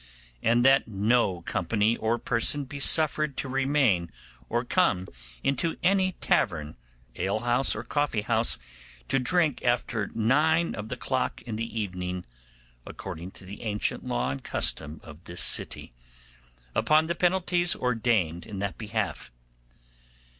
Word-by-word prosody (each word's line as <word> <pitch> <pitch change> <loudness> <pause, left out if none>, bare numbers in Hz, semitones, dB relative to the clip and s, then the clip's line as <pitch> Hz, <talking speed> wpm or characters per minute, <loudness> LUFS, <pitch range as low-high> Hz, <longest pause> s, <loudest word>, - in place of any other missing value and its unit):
And 120 +2 +3
that 135 0 +5
no 105 -3 +1
company 105 +7 +1
or 115 +1 0
person 120 +5 +2
be 140 +2 -8
suffered 155 -1 +3
to - - -2
remain 130 - +1 0.4
or - - 0
come 90 0 +2 0.4
into 140 +5 0
any 185 0 +3
tavern, 75 - 0 0.4
ale 100 +3 -1
house, 120 +2 +2
or - - -5
coffee 145 -8 -1
house 115 - +2 0.5
to 135 - +2
drink 155 +1 +1
after 120 -4 0
nine 155 +9 +2
of 105 +1 -6
the 125 - -4
clock 130 0 -2
in 115 -3 -5
the 115 +1 -3
evening, 90 -3 -4 0.6
according 85 +8 -7
to 95 - -10
the 100 +2 -9
ancient 105 -2 -1
law - - -1
and 70 - -6
custom 75 +2 -1
of 80 +2 -13
this 85 0 -4
city, - - 0 0.8
upon 155 +1 +3
the 170 - -1
penalties 175 0 +2
ordained 110 -9 0
in 105 - -7
that 100 0 -3
behalf. 110 -3 -3
115 Hz, 140 wpm, -27 LUFS, 100-140 Hz, 0.8 s, that